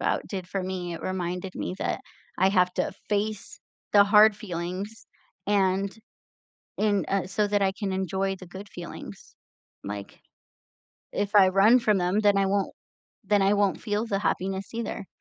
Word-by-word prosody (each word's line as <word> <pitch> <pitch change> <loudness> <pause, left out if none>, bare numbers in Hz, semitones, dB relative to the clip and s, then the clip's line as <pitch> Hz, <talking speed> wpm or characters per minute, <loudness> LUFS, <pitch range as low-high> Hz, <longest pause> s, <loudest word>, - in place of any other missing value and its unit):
about, - - 0
did 185 -3 -5
for 195 0 -2
me, 180 -2 -4
it - - -8
reminded 180 0 -3
me - - -3
that - - -2 0.4
I 190 - +5
have 180 -2 +3
to - - 0 0.2
face 210 0 -2 0.3
the 205 - +8
hard 210 +1 +6
feelings, 190 +2 -5 0.4
and 195 0 +1 0.8
en 205 -4 +2
uh, 195 -2 0
so 205 +3 0
that 205 0 +1
I 190 -1 +2
can 200 -3 -2
enjoy 190 +1 -1
the 185 - -12
good 190 +3 -10
feelings, 175 -2 -10 0.5
like, 100 0 -7 0.9
if 205 +1 -2
I 195 -2 +8
run 200 +6 +6
from 215 -3 +3
them, 180 +3 +1
then 205 -2 +4
I 195 - +3
won't 195 0 0 0.5
then 205 -1 +3
I 195 +1 +4
won't 205 -2 +1
feel 210 0 -1
the 200 -4 -1
happiness, 195 0 -2
either. 230 -3 -4
195 Hz, 165 wpm, -26 LUFS, 185-205 Hz, 0.9 s, the